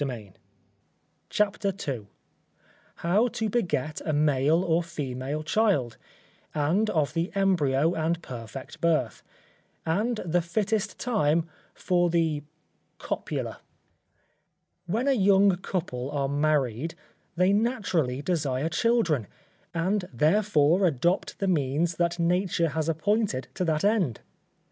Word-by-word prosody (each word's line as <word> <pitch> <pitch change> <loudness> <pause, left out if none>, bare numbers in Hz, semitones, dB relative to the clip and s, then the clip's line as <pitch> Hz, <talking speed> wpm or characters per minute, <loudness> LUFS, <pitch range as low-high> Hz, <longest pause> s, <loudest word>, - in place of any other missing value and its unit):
CHAPTER 205 -1 +1 0.2
II 120 -7 -3 1.0
How 205 +8 +3
to 220 -2 -2
beget 155 - -1
a 155 - -1
male 150 +3 +3
or 170 -2 +2
female 145 -2 -4
child; 165 - +1 0.6
and 170 +9 +1
of 155 -7 0
the 170 +2 -1
Embryo 165 -6 +2
and 165 +1 0
perfect 120 +1 -8
Birth; 155 -10 +1 0.6
and 210 +9 +1
the 175 +1 +2
fittest 210 +4 -1
time 165 -9 +1 0.3
for 175 -1 +1
the 165 -3 +1 0.6
copula. - - -4 1.3
When 225 +9 0
a - - +5
young 195 -4 +4
couple 160 -9 -3
are 140 -2 -1
married, 145 -1 0 0.4
they 180 +3 +3
naturally 185 - 0
desire 145 -4 0
children; 170 - +1 0.4
and 185 +3 0
therefore 160 - +3
adopt 170 +5 0
the 195 - -1
means 160 0 +1
that 170 0 +1
nature 170 -1 +1
has 160 +2 -2
appointed 165 - 0
to - - -2
that 155 -2 0
end. 195 - +1
165 Hz, 110 wpm, -27 LUFS, 145-195 Hz, 1.3 s, a